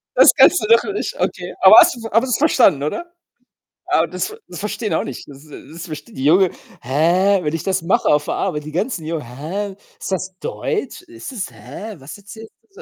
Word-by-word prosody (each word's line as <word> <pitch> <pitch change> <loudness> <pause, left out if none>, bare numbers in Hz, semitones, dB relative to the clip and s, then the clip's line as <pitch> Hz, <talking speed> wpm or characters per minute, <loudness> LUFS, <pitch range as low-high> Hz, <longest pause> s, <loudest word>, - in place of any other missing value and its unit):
Das - - +7
kannst 360 - +6
du - - -2
doch 230 +1 +5
nicht 415 - -4
okay. - - -3
Aber - - +9
hast - - +5
du 235 -2 -10
aber 225 0 +3
du - - -5
hast - - -3
es 225 - +2
verstanden, 235 - +3
oder? 345 - -4 0.7
Ah, 160 - +2
das 180 +2 -4
ver 435 +1 -10
das 175 - -9
verstehen 210 +1 -3
auch - - 0
nicht 130 - -8
das 140 +1 -13
s - - -19 0.2
das 170 +1 -8
verstehen 150 -2 -9
die 130 - -4
Jungen: 180 +4 +4 0.3
„Hä?“ 170 +9 +2
Wenn 150 0 -2
ich 165 - -4
das 190 -2 -1
mache 170 +4 +1
auf 150 0 +2
der - - -2
Arbeit, 150 -6 -3
die 155 - -7
ganzen 180 -2 -2
Jungen: 160 -1 -3
„Hä? 170 - -5 0.2
Ist - - -6
das 185 0 -3
Deutsch? 450 -5 -4
Ist 345 -4 -10
das, 220 -7 -5
hä 215 0 -9
was 135 +7 -10
erzählst 220 +2 -12 0.2
du?“, 455 - -12
190 Hz, 230 wpm, -19 LUFS, 155-225 Hz, 0.7 s, Aber